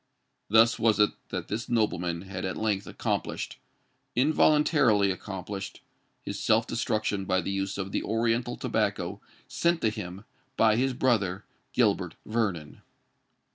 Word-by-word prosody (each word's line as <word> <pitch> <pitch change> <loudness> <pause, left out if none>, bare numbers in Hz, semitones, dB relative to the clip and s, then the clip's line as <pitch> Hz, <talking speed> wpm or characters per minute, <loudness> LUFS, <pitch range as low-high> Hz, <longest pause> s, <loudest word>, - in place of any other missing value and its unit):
Thus 115 +2 +5
was 110 -2 +3
it 105 - +5 0.2
that - - -4
this 110 +3 -4
nobleman 90 -7 0
had 95 -1 -6
at 95 - -3
length 105 -3 -1
accomplished—involuntarily 140 -6 +1
accomplished—his 95 +1 -7
self 110 +1 +3
destruction 110 -4 -1
by 95 0 +2
the 95 +2 -3
use 95 0 -2
of 95 -1 -4
the - - -1
oriental 115 +2 0
tobacco - - -1 0.3
sent 170 0 +1
to 110 - +2
him 100 -1 -7 0.3
by 110 -1 +5
his 130 +3 +1
brother 105 -7 +1 0.3
Gilbert - - +1
Vernon! 100 -10 -2
105 Hz, 125 wpm, -28 LUFS, 95-115 Hz, 0.3 s, Thus